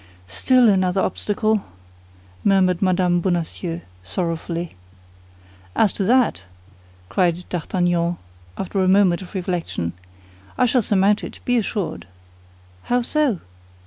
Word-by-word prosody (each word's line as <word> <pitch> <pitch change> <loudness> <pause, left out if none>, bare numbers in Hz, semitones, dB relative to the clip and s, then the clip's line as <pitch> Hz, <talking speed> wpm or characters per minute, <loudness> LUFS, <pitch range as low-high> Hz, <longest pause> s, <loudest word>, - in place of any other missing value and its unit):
"Still 245 - +3
another 190 -2 +2
obstacle," 210 +2 0 0.8
murmured 185 -3 +3
Mme. 180 -2 +2
Bonacieux, 175 -1 -2 0.2
sorrowfully. 165 - -3 1.0
"As 210 - +3
to 200 - -2
that," 245 - +3 0.7
cried 175 - 0
D'Artagnan, 175 0 0 0.4
after 195 +1 -2
a - - +2
moment 190 -2 +4
of 185 - -11
reflection, 175 - -2 0.6
"I 250 - +4
shall 250 +1 +3
surmount 200 0 +2
it, - - -8
be 245 - +2
assured." 205 - -2 0.8
"How 245 0 +1
so?" 280 - +1
185 Hz, 110 wpm, -21 LUFS, 175-210 Hz, 1.0 s, moment